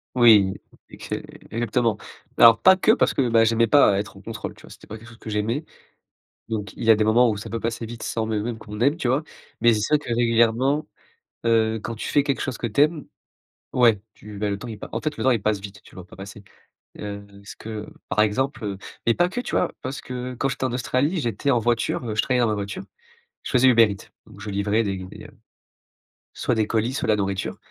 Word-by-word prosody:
Oui, 110 -6 +6 0.3
exé - - -6 0.3
exactement, 115 -1 0 0.4
alors 115 -1 +8
pas 190 0 +7
que 190 +3 +3
parce - - +2
que, 130 -3 +1
bah, 115 -1 +5
j'aimais 115 +1 +3
pas 105 -6 +5
être 100 -1 -6
en - - -13
contrôle, 110 +1 -7
tu - - -18
vois? - - -14
C'était - - -15
pas 110 - -7
quelque 115 - -15
chose 115 -1 -14
que - - -8
j'aimais 110 +8 -1 0.8
donc 105 -4 -4
il - - -6
y 115 - +5
a - - +9
des 105 - +1
moments 115 +2 +4
où 105 - -3
ça 105 - -7
peut 115 -1 -4
passer 115 0 -3
vite 115 0 -9
sans 110 -1 -2
même 110 -2 -1
même 115 0 -4
qu'on 105 -1 -9
aime, 140 +6 +3
tu 125 - -1
vois? 130 +5 +2 0.4
Mais 120 0 +6
c'est 105 - 0
sûr 150 +8 +2
que 120 -5 -5
régulièrement, 120 +5 +2 0.6
heu, 110 -1 +2
quand 115 - -4
tu 110 - -5
fais 145 -1 +2
quelque 140 -2 -1
chose 130 -4 -3
que - - -2
tu 110 +4 -1
aimes, 150 0 +2 0.7
ouais, 115 -5 +4
tu 105 -1 -11
bah, 105 0 -1
le 100 - -2
temps, 125 - -8
il 110 -2 -7
pa - - -9
en - - -2
fait, 155 -1 -3
le - - -4
temps 130 - +4
il 115 -4 +1
passe 105 -1 0
vite, 105 0 -10
tu - - -19
le 95 - -8
vois 90 - -16
pas - - -15
passer, 100 +1 -10 0.6
heu, 100 -1 -6
est - - -20
ce - - -9
que 110 -1 -7 0.2
par - - +1
exemple, 120 +5 0
heu, 100 -2 -4 0.3
mais 115 - +3
pas 175 0 +2
que, 220 +7 -4
tu - - -3
vois? - - +1
Parce 135 +2 -5
que 125 0 -6
quand 135 +3 -1
j'étais 135 - -3
en 130 - -1
Australie, 130 +7 0
j'étais 120 +1 -1
en 125 - +3
voiture, 120 +2 0
heu, 110 - -2
je 110 - +2
travaillais 125 -1 +1
dans 120 - +3
ma 110 - 0
voiture, 100 - -5 0.6
je - - -6
faisais 130 0 +5
Uber 115 -2 +7
Eat 100 -2 -9 0.2
donc 110 -3 -15
je 105 - -5
livrais 100 +3 +1
des 100 -3 -2
des 95 0 -10 1.1
soit - - -1
des 110 -1 +1
colis, 115 +3 0
soit - - -2
la 110 - +4
nourriture 95 -2 -2
115 Hz, 250 wpm, -23 LUFS, 105-125 Hz, 1.1 s, a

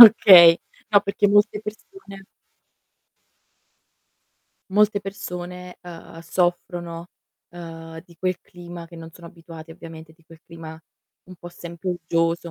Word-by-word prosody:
Okay, 185 -7 +10 0.3
no 205 - +6
perché 200 0 0
molte 205 +1 +3
persone 210 - -11 2.5
Molte 210 +1 +2
persone, 180 -2 -8
ehm, 170 -2 -11
soffrono, 175 0 -3 0.4
ehm, 165 -1 -10
di 170 -2 -20
quel 185 +1 -2
clima 175 -1 -11
che 170 0 -14
non 165 0 -10
sono 170 +1 -14
abituati, 165 -1 -13
ovviamente 165 -1 -12
di 165 0 -29
quel 165 -1 -17
clima 160 -1 -11 0.4
un 185 - -13
po' 175 - -10
sempre 170 +1 -7
uggioso, 165 0 -1
175 Hz, 120 wpm, -22 LUFS, 165-190 Hz, 2.5 s, Okay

